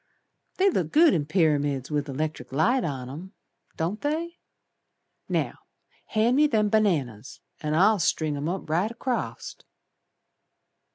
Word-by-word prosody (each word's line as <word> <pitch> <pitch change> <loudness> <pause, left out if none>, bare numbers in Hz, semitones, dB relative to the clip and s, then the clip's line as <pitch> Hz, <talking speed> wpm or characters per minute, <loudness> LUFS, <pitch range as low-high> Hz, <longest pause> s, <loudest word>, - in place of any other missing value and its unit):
They 385 - +4
look 170 - -1
good 320 0 +6
in 150 -3 -1
pyramids 145 -5 +1
with 145 -1 -1
the - - -5
'lectric 150 -2 -4
light 175 - +2
on 135 -5 -4
'em, 170 +9 -9 0.4
Don't 175 +6 -2
they? 330 +4 -3 0.9
Now - - -1 0.5
hand 230 +4 +2
me 300 +1 +5
them 215 -6 +1
bananas 145 - 0 0.2
An' 150 0 -1
I'll 200 +5 +4
string 155 -2 0
'em 145 +2 -3
right 180 +2 -1
acrost." 240 +1 -4
165 Hz, 130 wpm, -26 LUFS, 145-220 Hz, 0.9 s, good